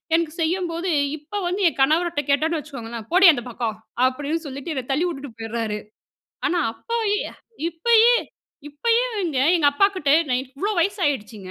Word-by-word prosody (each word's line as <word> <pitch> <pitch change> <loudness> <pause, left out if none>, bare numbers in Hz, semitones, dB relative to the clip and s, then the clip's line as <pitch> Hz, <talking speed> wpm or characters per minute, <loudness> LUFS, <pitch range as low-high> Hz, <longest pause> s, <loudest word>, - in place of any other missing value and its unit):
எனக்கு 330 -2 0
செய்யும்போது 345 +1 -1 0.3
இப்போ 310 +8 -7
வந்து 370 +3 -2
என் 310 - -2
கணவர்ட்ட 320 +2 +2
கேட்டோம்னு 315 +3 +2
வச்சுக்கோங்களேன், 235 -6 -8
"போடி 370 +2 +6
அந்த 245 - -3
பக்கம்" 225 -2 -3 0.3
அப்படீன்னு 290 +5 -1
சொல்லிட்டு 280 +4 -6
என்ன 260 -3 -3
தள்ளி 300 +6 +1
உட்டுட்டு 275 -5 -7
போயிர்றாரு. 225 -1 -3 0.7
ஆனா 355 -1 +1
அப்போ 465 - -5 0.2
ய் 415 - -1 0.4
இப்பயே 450 +7 +4 0.6
இப்பயே 465 +11 +1
வேங்க 340 -10 -1 0.2
எங்க 305 - +2
அப்பா 395 +8 +4
கிட்ட 295 -7 -1 0.2
நான் 250 +1 +1
இவ்வளோ 280 +11 -3
வயசாயிடுச்சுங்க. 275 - -1
305 Hz, 150 wpm, -22 LUFS, 260-355 Hz, 0.7 s, போடி